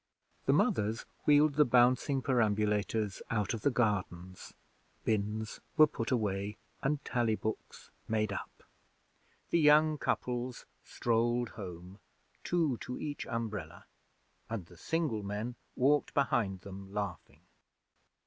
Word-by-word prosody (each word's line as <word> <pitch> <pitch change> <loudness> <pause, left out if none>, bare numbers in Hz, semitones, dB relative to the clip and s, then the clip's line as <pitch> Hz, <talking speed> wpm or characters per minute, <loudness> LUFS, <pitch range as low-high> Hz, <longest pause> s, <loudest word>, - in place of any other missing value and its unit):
The - - +5
mothers 110 +1 +1 0.2
wheeled 150 0 +6
the 150 +2 +5
bouncing 125 +2 +3
perambulators 105 -3 +1
out 105 -2 0
of 115 - -4
the 145 - +3
gardens; 95 -7 -1 0.5
bins 110 +1 -1 0.2
were 155 - +9
put 130 -6 -4
away, 105 -4 -1 0.2
and 145 +1 -1
tally 120 -3 +1
books 110 0 -6 0.2
made 110 -2 0
up. - - -7 0.9
The 170 - +4
young 150 0 +5
couples 125 0 -2 0.2
strolled 120 0 0
home, 90 0 -9 0.4
two 160 -8 +1
to 125 - -6
each 145 -2 -4
umbrella, 105 -8 -4 0.6
and 110 -6 -4
the 90 - -16
single 155 - -1
men 105 +4 -3 0.2
walked 145 +3 +2
behind 120 -10 +1
them 95 0 -9
laughing. 100 -3 -5
115 Hz, 120 wpm, -32 LUFS, 100-130 Hz, 0.9 s, were